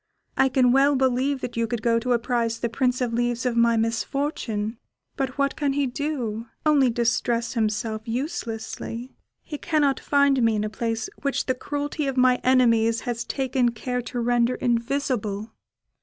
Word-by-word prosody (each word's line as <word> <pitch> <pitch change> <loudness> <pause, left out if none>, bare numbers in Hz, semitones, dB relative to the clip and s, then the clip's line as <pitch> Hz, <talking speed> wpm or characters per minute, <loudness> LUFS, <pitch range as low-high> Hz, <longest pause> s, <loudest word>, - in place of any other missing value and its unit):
I 265 - +3
can 255 -1 +3
well 275 +2 +4
believe 265 +1 +1
that 245 - -5
you 230 0 0
could 225 0 -3
go 230 -1 +3
to 250 +2 0
apprise 235 -1 0
the 235 - -2
Prince 250 +1 0
of 240 -2 -1
Leaves 240 +1 0
of 245 -2 0
my 235 0 +4
misfortune, 225 -1 -2 0.4
but 265 -1 -3
what 280 0 +1
can 285 -2 0
he 285 0 +1
do? 245 -5 -3 0.2
only 285 -4 +4
distress 235 0 0
himself 220 -1 -1
uselessly. 235 -1 -4 0.3
He 295 -2 -7
cannot 295 -4 +1
find 280 -2 +3
me 225 -1 +3
in 210 - 0
a 215 - -3
place 225 - -2
which 280 -1 -1
the 260 - +1
cruelty 290 +2 -3
of 270 -1 -2
my 255 0 +5
enemies 230 -3 +3
has 235 -1 -3
taken 260 -3 0
care 250 +2 -3
to 245 +1 -5
render 240 +1 +2
invisible." 230 -4 -1
245 Hz, 170 wpm, -24 LUFS, 230-270 Hz, 0.4 s, my